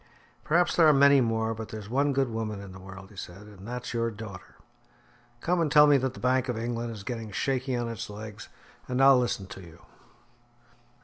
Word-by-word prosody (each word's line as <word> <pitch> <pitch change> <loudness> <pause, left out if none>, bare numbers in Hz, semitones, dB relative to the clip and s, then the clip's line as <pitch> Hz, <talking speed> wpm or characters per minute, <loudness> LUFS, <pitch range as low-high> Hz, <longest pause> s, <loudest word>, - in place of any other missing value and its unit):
"Perhaps 175 +3 +2
there 165 -2 +6
are 155 - +7
many 140 0 +6
more, 115 -1 0
but 110 0 -7
there's 110 -2 -7
one 140 +5 +1
good 135 -3 0
woman 110 -2 -3
in 100 -1 -9
the 95 - -11
world," 95 +1 -11
he - - -16
said, 95 +2 -9
"and 100 -1 -13
that's 125 +1 -5
your 115 0 0
daughter. 105 -4 -10 0.9
Come 175 0 +1
and 155 -3 0
tell 150 -1 +8
me 145 -1 +6
that 130 -1 -2
the - - -10
Bank 130 0 +1
of 120 - -1
England 115 0 -3
is 105 -3 -8
getting 115 -1 -5
shaky 130 +3 -1
on 120 -1 -2
its 115 -1 -5
legs, 105 0 -9 0.4
and 125 0 -2
I'll 135 -1 +7
listen 120 -5 -1
to 95 - -10
you." 85 -2 -14
115 Hz, 210 wpm, -28 LUFS, 105-130 Hz, 0.9 s, tell